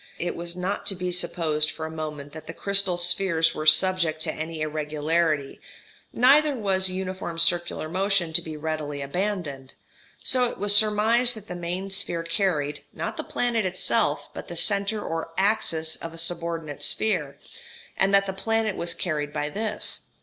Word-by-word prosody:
It 175 0 -3
was 170 0 -4
not 185 +3 -3
to 195 - +3
be 180 0 -3
supposed 155 -3 +2
for 160 +1 -5
a 160 - -6
moment 150 -2 -6
that 155 - -10
the - - -7
crystal 200 -3 +2
spheres 175 -2 +1
were 155 0 -4
subject 160 -1 +4
to - - -1
any 160 0 -5
irregularity, 155 0 -1 0.5
neither 285 +4 +5
was 190 -4 +1
uniform 185 -2 -4
circular 170 -1 +2
motion 185 -1 +1
to 170 - +5
be 160 -2 -7
readily 150 -2 -3
abandoned; 145 -5 -3 0.5
so 255 -1 +4
it - - -8
was 205 0 +2
surmised 220 +3 +4
that 215 -1 -11
the 180 - -5
main 175 +3 -4
sphere 170 -3 0
carried, 155 -6 0
not - - -4
the - - -4
planet 235 -3 0
itself, 185 0 0
but - - -8
the - - -7
centre 205 +1 +2
or 165 0 -4
axis 190 -6 0
of 165 0 -7
a - - -11
subordinate 165 -3 -3
sphere, 165 -11 -1 0.6
and 190 +1 +2
that 200 0 +5
the 190 - -3
planet 225 +1 -1
was 170 0 -2
carried 150 -4 -2
by 150 0 -2
this. 210 +5 -1
175 Hz, 170 wpm, -25 LUFS, 155-200 Hz, 0.6 s, neither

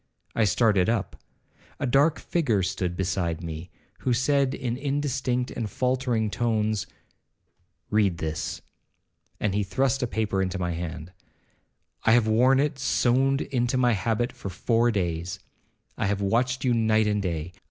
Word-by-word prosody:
I 110 - +2
started 105 -1 +3
up. 110 -5 -1 0.6
A - - -1
dark 140 +5 +3
figure 120 - 0
stood 90 -1 -2
beside 85 -3 -1
me, 80 +1 -6 0.3
who 125 - 0
said 135 +1 +2
in 120 -3 -3
indistinct 135 -2 -1
and 110 -3 -4
faultering 125 -2 0
tones, 110 -3 0 1.0
'Read 100 -5 +2
this,' 80 -1 -4 0.8
and 105 - 0
he 105 - +1
thrust 130 +7 0
a 125 - 0
paper 105 -4 -1
into 95 0 -1
my 90 -1 -1
hand; 85 0 -5 0.9
'I 110 - +6
have 120 -2 +4
worn 125 +5 +4
it 140 -1 0
sewed 135 +2 +2
into 120 0 0
my 125 -1 +3
habit 115 +4 0
for 100 - -7
four 115 +6 +1
days. 90 -3 -2 0.6
I - - +1
have 100 0 0
watched 125 +6 0
you 125 -2 +2
night 110 -1 +3
and 105 -1 +1
day. 85 -3 -3
110 Hz, 150 wpm, -26 LUFS, 95-125 Hz, 1.0 s, I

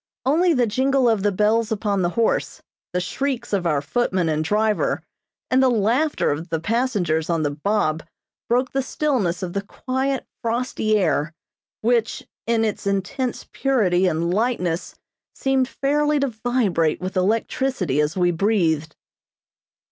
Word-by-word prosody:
Only 330 +5 +3
the 250 -2 +3
jingle 260 +3 +2
of 220 -4 +2
the 205 +1 +2
bells 215 +3 +1
upon 205 -2 0
the 175 - +1
horse, 230 - 0 0.3
the 180 - 0
shrieks 250 +4 -3
of 185 -3 +1
our 145 -3 +1
footman 185 0 0
and 155 0 0
driver, 210 +4 +1 0.5
and 260 +1 +4
the 260 - +5
laughter 240 +7 +1
of 160 +4 -4
the 165 0 -1
passengers 190 -6 0
on 165 -2 +1
the 145 - 0
"bob" 160 0 0 0.5
broke 250 +2 +1
the 270 - 0
stillness 240 - -1
of 175 -1 -4
the 200 - -1
quiet, 260 +6 -2 0.2
frosty 230 -2 0
air, 155 -4 0 0.5
which, 230 -1 0 0.2
in 230 -1 +2
its 210 -2 -3
intense 235 +6 -2
purity 190 -9 +2
and 170 +1 0
lightness 190 -6 -1 0.4
seemed 270 -1 +1
fairly 295 +2 +1
to 275 - +1
vibrate 220 -9 0
with 185 +2 -5
electricity 195 - 0
as 150 +4 -1
we 175 -1 +3
breathed. 165 -5 +1
215 Hz, 150 wpm, -22 LUFS, 175-255 Hz, 0.5 s, the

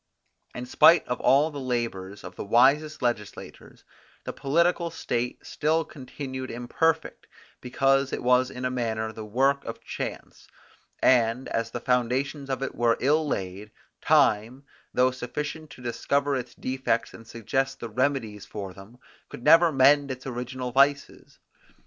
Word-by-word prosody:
In 120 - -5
spite 165 +6 +5
of 125 - -3
all 145 +4 +4
the 145 - -6
labours 115 -7 -4
of 90 - -9
the - - -5
wisest 135 +8 +3
legislators, 115 -4 -5 0.4
the - - -5
political 170 +4 +1
state 120 -5 -3
still 160 +2 0
continued 130 -1 -7
imperfect, 155 +7 -1 0.3
because 135 +2 +1
it - - -4
was 125 +1 +3
in 125 0 -6
a 125 - 0
manner 110 -3 -2
the 110 0 -8
work 135 +6 +1
of 115 - -7
chance; - - -7 0.6
and, 120 0 +3
as 115 0 -2
the 120 - -5
foundations 130 +4 -1
of 135 0 -2
it 135 - -4
were 120 -1 +2
ill 150 +4 +2
laid, 95 -3 -4 0.3
time, 115 +6 +2 0.3
though 130 0 +3
sufficient 150 +5 -5
to 125 - -13
discover 140 +4 0
its 125 -2 -5
defects 130 -2 -2
and 115 - -13
suggest 135 +4 -2
the 115 - -5
remedies 115 -3 -1
for 100 -3 -7
them, 100 +6 -14 0.3
could 120 - -10
never 165 +3 +6
mend 140 +1 +4
its 130 0 -6
original 125 0 -5
vices. 140 +2 +1
130 Hz, 150 wpm, -26 LUFS, 115-140 Hz, 0.6 s, never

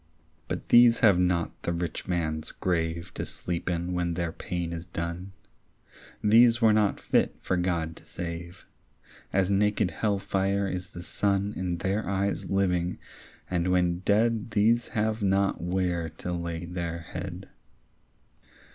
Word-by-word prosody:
But - - -5
these 120 -1 +7
have 100 -6 +6
not 90 -2 0
the - - -1
rich 85 -1 -3
man's 80 -3 -1
grave 85 0 -2
To - - -4
sleep 85 0 -4
in 85 +1 -2
when 85 -1 -1
their 85 -1 -1
pain 85 0 -4
is 85 +1 -6
done. 85 +2 -4 0.9
These 115 +2 +6
were 110 -3 +5
not 105 -2 +2
fit - - +1
for 95 - -1
God 85 -3 -1
to - - -15
save. 85 +1 -7 0.7
As 95 0 +2
naked 105 +1 +2
hell 105 -2 0
fire 100 0 0
is 90 -1 -4
the 85 - -9
sun 100 +1 0
In 90 -2 -2
their 95 +4 -1
eyes 100 0 -1
living, 90 -2 +1 0.5
and 90 -1 0
when 90 -1 +2
dead 110 +3 +2
These 115 +3 +3
have 110 0 -1
not 100 0 +1
where 90 -2 -1
to 80 +3 -6
lay 85 -1 -4
their 85 -1 -4
head. 80 - -7
90 Hz, 145 wpm, -27 LUFS, 85-100 Hz, 0.9 s, these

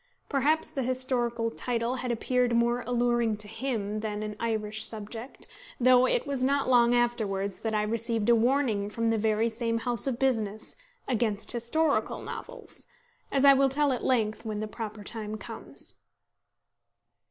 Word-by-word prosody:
Perhaps 300 +3 +1
the 270 - -2
historical 245 -2 -1
title 240 +1 -2
had 250 -1 -1
appeared 245 +1 +1
more 235 +1 +2
alluring 240 -2 +1
to 210 0 -2
him 215 -3 -3
than 210 -1 -3
an 210 -1 -5
Irish 220 -1 -1
subject; 225 +3 -5 0.3
though 255 0 +6
it - - +1
was 280 -3 -2
not 280 +2 +2
long 245 -1 +5
afterwards 210 -5 0
that 220 -1 -2
I 210 - +2
received 230 0 -1
a 235 - +6
warning 230 -4 +1
from 230 +1 0
the 225 - +1
very 220 +1 +2
same 230 0 -1
house 240 0 0
of 255 -3 0
business 220 -5 -1 0.3
against 220 -4 0
historical 285 +6 0
novels, - - -9 0.4
as 275 0 +3
I 280 - +10
will 270 0 +4
tell 285 0 +2
at 250 - -4
length 220 -4 +1
when 215 -2 -3
the 215 - -3
proper 215 -1 -6
time 215 0 -5
comes. - - -8
235 Hz, 160 wpm, -28 LUFS, 215-255 Hz, 0.4 s, I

